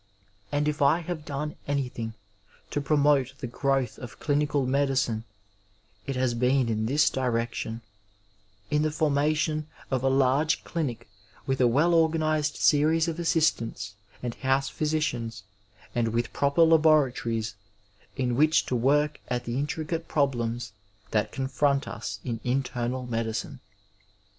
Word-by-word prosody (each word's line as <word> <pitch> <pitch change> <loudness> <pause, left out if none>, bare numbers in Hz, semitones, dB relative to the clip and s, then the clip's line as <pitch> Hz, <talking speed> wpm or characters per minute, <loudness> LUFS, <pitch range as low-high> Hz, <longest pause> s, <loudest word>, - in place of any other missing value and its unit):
And 145 +1 +1
if 150 -1 -1
I 145 +5 +4
have 165 -2 -5
done 150 +1 -4
anything 125 -5 -2 0.6
to 145 - -1
promote 140 -3 +2
the 140 - -5
growth 135 0 -1
of 120 -4 -9
dinical 145 -2 +1
medicine 130 -5 +1 0.8
it 135 - -2
has 130 -1 +1
been 125 +1 +2
in 110 0 0
this 145 +4 +3
direction, 115 -2 -1 0.9
in 150 - +3
the 155 - +2
formation 155 +1 +1 0.2
of 130 -2 +1
a 135 - +3
large 135 +3 +2
clinic 145 -11 -3 0.4
with 135 -1 0
a 125 - +6
well 150 +9 +3
organized 155 -2 +2
series 160 +2 +3
of 165 0 -3
assistants 120 - 0 0.3
and 120 -1 -2
house 135 +1 0
physicians 120 -8 -2 0.5
and 120 -1 +1
with 115 +1 -1
proper 140 +4 +3
laboratories 140 - +3 0.6
in 125 -3 0
which 155 +4 +4
to 125 - -1
work 145 +5 +2
at 125 -1 -2
the 120 +2 -2
intricate 160 +3 -3
problems 120 -5 -1 0.4
that 105 -1 +1
confront 140 0 0
us 110 -3 -5
in 115 -3 -3
internal 125 0 -1
medicine. 115 -2 -3
135 Hz, 135 wpm, -27 LUFS, 120-150 Hz, 0.9 s, a